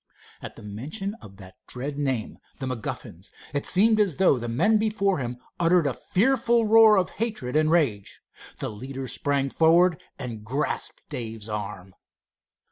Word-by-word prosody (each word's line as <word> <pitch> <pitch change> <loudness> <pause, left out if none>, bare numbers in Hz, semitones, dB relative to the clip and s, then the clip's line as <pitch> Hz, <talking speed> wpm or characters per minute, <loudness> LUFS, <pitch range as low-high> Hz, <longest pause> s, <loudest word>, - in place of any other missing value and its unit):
At - - -8
the - - -12
mention 140 - -5
of 100 -1 -13
that 95 -2 -14
dread 135 +3 -5
name, 130 -6 -2 0.2
"the 135 - -5
MacGuffins," 110 -7 -6 0.2
it 145 - -1
seemed 215 +3 +4
as 195 -8 +2
though 180 -8 +4
the 120 - -5
men 210 - +3
before 200 -4 +1
him 120 -1 -4 0.2
uttered 170 -1 +3
a 140 - +1
fearful 235 - +2
roar 220 -1 +7
of 185 -3 +1
hatred 210 - -2
and 155 0 +3
rage. 140 - 0 0.4
The - - -3
leader 130 +5 -7
sprang 140 +1 -1
forward 165 +1 +4 0.2
and 115 -4 -6
grasped 135 +7 -3
Dave's 110 -2 -6
arm. 100 -3 -6
145 Hz, 155 wpm, -25 LUFS, 120-195 Hz, 0.4 s, roar